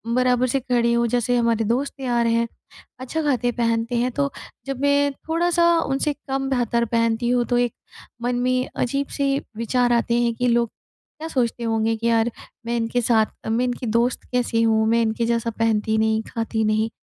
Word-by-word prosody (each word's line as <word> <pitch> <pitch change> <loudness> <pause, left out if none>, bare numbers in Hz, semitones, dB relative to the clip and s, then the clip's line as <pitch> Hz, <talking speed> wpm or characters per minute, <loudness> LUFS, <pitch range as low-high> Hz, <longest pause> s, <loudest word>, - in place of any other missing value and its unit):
बराबर 255 0 +2
से 270 +2 0
खड़े 240 -2 +1
हो 235 0 +2
जैसे 245 +1 +1
हमारे 230 -1 +1
दोस्त 260 +6 -1
यार 240 -2 +1
हैं 230 0 +1 0.5
अच्छा 290 +5 -3
खाते-पहनते 240 -3 0
हैं। 245 +2 +1
तो 280 +1 -1 0.3
जब 270 -2 -4
मैं 285 0 +3 0.2
थोड़ा-सा 340 +1 +2
उनसे 275 +1 0 0.2
कम 270 0 -1
बेहतर 235 -2 +1
पहनती 230 +1 0
हूँ, 245 -1 +2
तो 245 - 0
एक 245 -2 +1 0.5
मन 245 +1 0
में 255 0 0
अजीब 275 +3 -1
से 275 0 +1 0.2
विचार 245 +1 +1
आते 235 0 +1
हैं 235 -1 +1
कि 250 +1 0
लोग 235 0 +2 0.5
क्या 320 - -5
सोचते 240 -5 -1
होंगे 225 0 +1
कि 230 +1 -2
यार 230 0 +2 0.3
मैं 235 +1 -1
इनके 230 +2 0
साथ 220 -2 0
मैं 235 +3 +1
इनकी 245 -1 -3
दोस्त 235 +3 +1
कैसे 240 -2 +1
हूँ 220 -1 +3
मैं 230 0 +3
इनके 225 +1 0
जैसा 230 0 0
पहनती 220 -1 +1
नहीं, 220 0 +2
खाती 225 -1 -2
नहीं? 215 +1 +1
240 Hz, 185 wpm, -22 LUFS, 230-255 Hz, 0.5 s, मैं